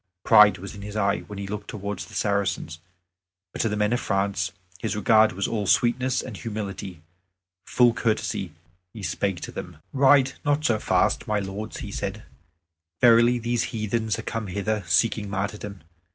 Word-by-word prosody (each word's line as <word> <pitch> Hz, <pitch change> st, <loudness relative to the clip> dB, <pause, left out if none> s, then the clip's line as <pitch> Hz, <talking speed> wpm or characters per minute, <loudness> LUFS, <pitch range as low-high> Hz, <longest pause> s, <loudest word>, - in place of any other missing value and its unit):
Pride 105 Hz, -2 st, +7 dB
was 95 Hz, +2 st, -8 dB
in 100 Hz, -, -10 dB
his 105 Hz, +1 st, -7 dB
eye 100 Hz, -1 st, +1 dB
when 105 Hz, -, -8 dB
he 100 Hz, -, -4 dB
looked 105 Hz, +1 st, -6 dB
towards 100 Hz, -2 st, -5 dB
the -, -, -13 dB
Saracens; 100 Hz, -5 st, -1 dB, 0.7 s
but -, -, -2 dB
to 115 Hz, -, +1 dB
the 105 Hz, -, -2 dB
men 105 Hz, +2 st, +1 dB
of 120 Hz, -, +1 dB
France 95 Hz, -3 st, -1 dB, 0.3 s
his 110 Hz, -, -2 dB
regard 110 Hz, +1 st, +4 dB
was 100 Hz, +1 st, -1 dB
all 105 Hz, -3 st, -2 dB
sweetness 125 Hz, +5 st, +2 dB
and 110 Hz, -6 st, -7 dB
humility. 100 Hz, -6 st, -6 dB, 0.6 s
Full 120 Hz, -2 st, +4 dB
courteously 115 Hz, -2 st, -1 dB, 0.4 s
he 105 Hz, -, -8 dB
spake 90 Hz, +1 st, -2 dB
to -, -, -6 dB
them: 85 Hz, -3 st, -8 dB, 0.2 s
"Ride 135 Hz, 0 st, +5 dB
not 145 Hz, 0 st, +1 dB
so 110 Hz, -2 st, +2 dB
fast, -, -, +1 dB
my 105 Hz, -, +1 dB
lords," 100 Hz, +2 st, -6 dB
he 105 Hz, -, -6 dB
said; 100 Hz, +2 st, -4 dB, 0.8 s
"verily 120 Hz, +1 st, +6 dB
these 120 Hz, 0 st, -1 dB
heathen 110 Hz, 0 st, -2 dB
are -, -, -6 dB
come 115 Hz, -2 st, -4 dB
hither, 100 Hz, +2 st, -2 dB
seeking 105 Hz, +4 st, +2 dB
martyrdom. 100 Hz, 0 st, -4 dB
105 Hz, 170 wpm, -25 LUFS, 100-115 Hz, 0.8 s, Pride